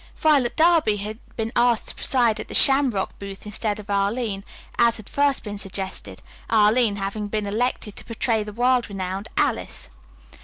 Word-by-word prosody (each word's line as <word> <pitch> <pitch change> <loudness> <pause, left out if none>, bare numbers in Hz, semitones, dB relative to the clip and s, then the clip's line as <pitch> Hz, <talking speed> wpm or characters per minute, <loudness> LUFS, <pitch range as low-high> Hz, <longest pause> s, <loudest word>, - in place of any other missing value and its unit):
] - - -28
Violet 285 -6 +2
Darby 320 -10 +4
had 210 +2 -6 0.2
been 225 0 -2
asked 240 -2 +2
to - - -7
preside 240 -4 +1
at - - -6
the - - -4
Shamrock 270 -8 +3
booth 195 0 -8
instead 210 0 -2
of 210 - -10
Arline, 200 +1 -1 0.4
as 235 0 +4
had 215 - -11
first 285 -1 +1
been 205 -1 -6
suggested, 190 - -5 0.3
Arline 220 0 +4
having 200 +1 -3
been 210 0 -2
elected 215 0 -2
to - - -10
portray 230 -1 0
the 210 - -7
world 245 +2 +1
renowned 195 +1 -4
Alice. - - -1
215 Hz, 175 wpm, -23 LUFS, 200-245 Hz, 0.4 s, Darby